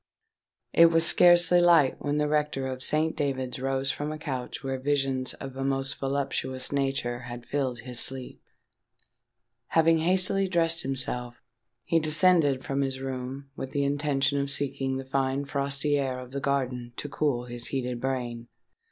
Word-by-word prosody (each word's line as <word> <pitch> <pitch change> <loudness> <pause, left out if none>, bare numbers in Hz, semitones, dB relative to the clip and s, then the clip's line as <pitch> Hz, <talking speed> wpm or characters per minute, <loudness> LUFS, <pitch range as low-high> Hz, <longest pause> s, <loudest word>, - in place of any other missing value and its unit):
It 170 - +8
was 165 0 +3
scarcely 175 +1 +5
light 165 -6 +4
when 145 0 0
the 150 0 +1
rector 150 -2 0
of 130 -1 -4
Saint 155 +3 +1
David's 130 -3 -2
rose 135 +1 0
from 150 +1 -4
a 155 - -5
couch 135 -5 -5
where 135 -1 -3
visions 135 -2 -1
of 135 -1 -8
a 135 - -3
most 135 0 -1
voluptuous 135 -1 -2
nature 135 -3 -1
had 120 0 -8
filled 130 -4 -2
his 125 -1 -4
sleep. 130 -1 -3 1.3
Having 165 0 +3
hastily 185 +3 +4
dressed 165 -2 +2
himself, 125 -2 -2 0.5
he 165 - +2
descended 155 -3 +3
from 140 0 -1
his 135 -1 -2
room 135 +1 -6
with 135 - -6
the 140 - +1
intention 140 0 +1
of 140 - -3
seeking 135 -1 -1
the 135 - -6
fine 135 +1 -1
frosty 140 +1 0
air 130 -2 -2
of 125 0 -9
the 140 0 -4
garden 125 -3 -2
to - - -5
cool 140 -4 -1
his 120 -1 -4
heated 125 -3 -3
brain. 120 -3 -3
135 Hz, 160 wpm, -27 LUFS, 130-150 Hz, 1.3 s, It